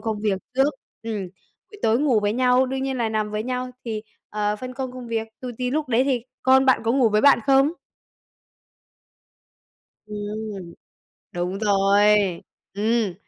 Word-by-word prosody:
công 220 -2 -3
việc 205 -3 0 0.2
trước. 270 +3 +2 0.3
Ừm, 225 -2 -3 0.5
buổi 415 - -13
tối 225 +1 +3
ngủ 260 -6 +2
với 205 0 0
nhau, 255 +1 +3
đương 265 +1 -3
nhiên 270 -1 -2
là 230 -2 0
nằm 215 -1 -1
với 210 0 -2
nhau 250 +1 -3
thì, 220 -3 -4 0.3
ờ, 210 0 -1
phân 255 +3 -7
công 260 -1 -4
công 250 -1 -8
việc, 225 -1 -2
tù 255 - -6
tì 250 -1 -1
lúc 300 +1 -1
đấy 245 +1 +3
thì, 260 -4 0 0.2
con 265 +1 +5
bạn 260 - +4
có 225 - +2
ngủ 255 -3 +4
với 210 0 +2
bạn 280 - +6
không? 275 +1 +5 2.4
Ừm, 210 -3 -6 0.6
đúng 180 +2 -2
rồi. 200 -1 +3 0.7
Ừm. 215 -1 0
230 Hz, 165 wpm, -23 LUFS, 210-255 Hz, 2.4 s, bạn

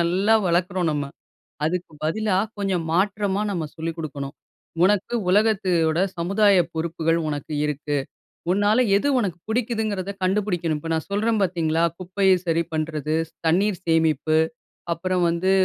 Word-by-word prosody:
நல்லா 190 +6 +2
வளர்க்குறோம் 180 0 +1
நம்ம. 145 -1 -3 0.6
அதுக்கு 175 0 -2
பதிலா 200 +3 +1 0.2
கொஞ்சம் 190 -5 -1
மாற்றமா 200 +1 +1
நம்ம 170 -5 -2
சொல்லிக் 165 +1 -4
குடுக்கணும். 140 -3 -5 0.5
"உனக்கு 205 +4 +2 0.2
உலகத்தோட 185 -6 +2 0.2
சமுதாய 200 +4 +3 0.2
பொறுப்புகள் 165 0 0
உனக்கு 145 +1 -4
இருக்கு. 150 0 -2 0.5
உன்னால 205 +4 +3 0.2
எது 285 - 0
உனக்கு 185 -6 -2
புடிக்குதுங்கிறத 220 -4 -1
கண்டுபிடிக்கணும்." 185 -5 0
இப்போ 165 +2 -5
நான் 160 - -3
சொல்றேன் 215 +1 +1
பார்த்தீங்களா, 165 -2 0 0.2
குப்பைய 190 +1 +2
சரி 165 0 +1
பண்றது, 155 -1 -1
ஸ் - - -35
தண்ணீர் 190 +2 +2
சேமிப்பு, 160 -1 +2 0.6
அப்புறம் 180 +1 -1
வந்து 170 +3 0
175 Hz, 125 wpm, -23 LUFS, 160-200 Hz, 0.6 s, சமுதாய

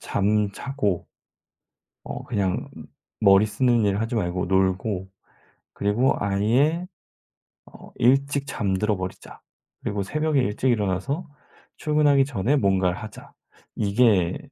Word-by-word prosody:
잠자고' 105 +1 -1 1.0
'어 - - -6
그냥 100 -6 -2 0.5
머리 100 0 +6
쓰는 120 0 +2
일 100 0 +1
하지 115 +2 -3
말고 90 -3 -1
놀고 95 +1 0 0.6
그리고 110 +7 +1
아예 120 - +1 0.8
어, - - -15
일찍 140 +3 +2
잠들어 105 -2 -1
버리자. 95 0 -8 0.4
그리고 100 -1 -2
새벽에 150 +6 0
일찍 125 +3 0
일어나서 115 - -1 0.5
출근하기 150 -3 +3
전에 135 +1 0
뭔가를 95 -5 +1
하자.' 110 -2 -11 0.4
이게 100 -4 +2
105 Hz, 230 characters per minute, -24 LUFS, 95-135 Hz, 1.0 s, 머리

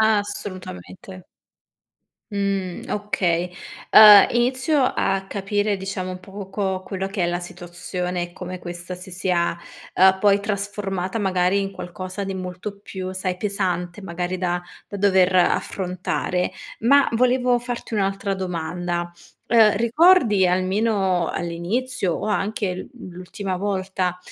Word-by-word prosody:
Assolutamente. 185 - -2 1.1
Mhmm, 195 -3 -2
okay. 180 -4 -1 0.4
Ehm, 210 -2 +10
inizio 260 +5 +1
a 195 -6 0
capire, 205 +1 -1
diciamo, 185 -1 -4
poco 195 0 -4
quello 190 0 -4
che 195 -2 -2
è - - +2
la 175 +1 -1
situazione, 175 0 -5
e 175 0 -6
come 180 0 -7
questa 175 0 -7
si 180 +1 -10
sia, 180 -2 0 0.4
ehm, 190 0 +5
poi 200 0 +4
trasformata, 200 -1 -3
magari, 185 -1 +1
in 195 0 -3
qualcosa 185 +2 -6
di 195 - -4
molto 185 +2 -6
più, 185 -2 -6
sai, 185 -1 -3
pesante, 185 -2 -2
magari, 180 -1 -4
da 175 -1 -1 0.3
da 200 - -6
dover 190 -2 +3
affrontare. 180 0 0 0.3
Ma, 275 +5 +5
volevo 250 +1 +3
farti 245 -1 -6
un'altra 195 -1 -1
domanda: 175 -1 -3 0.4
ehm, 220 -3 +5
ricordi, 235 - +4
almeno 185 -1 +1
all'inizio, 180 +5 -2
o - - -4
anche 210 - +1
anche 195 -5 -2
l 185 - -7 0.2
l'ultima 185 +1 -5
volta, 190 -2 -2
190 Hz, 125 wpm, -22 LUFS, 180-205 Hz, 1.1 s, Ehm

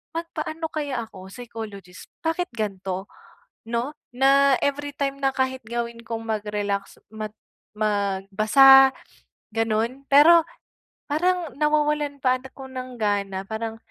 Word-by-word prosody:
magpaano 325 -1 -4
kaya 280 -6 -2
ako 190 -3 -12
psychologist, 215 -6 -9 0.2
bakit 330 +2 -1
gan'to 195 -3 -3 0.6
'no, 235 +5 -2 0.2
na 275 +1 +5
every 285 0 -1
time 275 -1 -2
na 270 -1 +2
kahit 260 -1 -1
gawin 235 0 -4
kong 225 0 -4
mag-relax 205 -2 -3
mag 215 -1 -6 0.4
magbasa, 215 +6 +5 0.6
gano'n 225 +4 -1
pero 320 +5 +8 0.7
parang 345 -1 0
nawawalan 300 -1 +1
pa 255 0 +3
ako 265 +1 -11
ng 255 -1 -7
gana. 200 -2 -1
Parang, 225 +1 -4
245 Hz, 110 wpm, -24 LUFS, 215-280 Hz, 0.7 s, pero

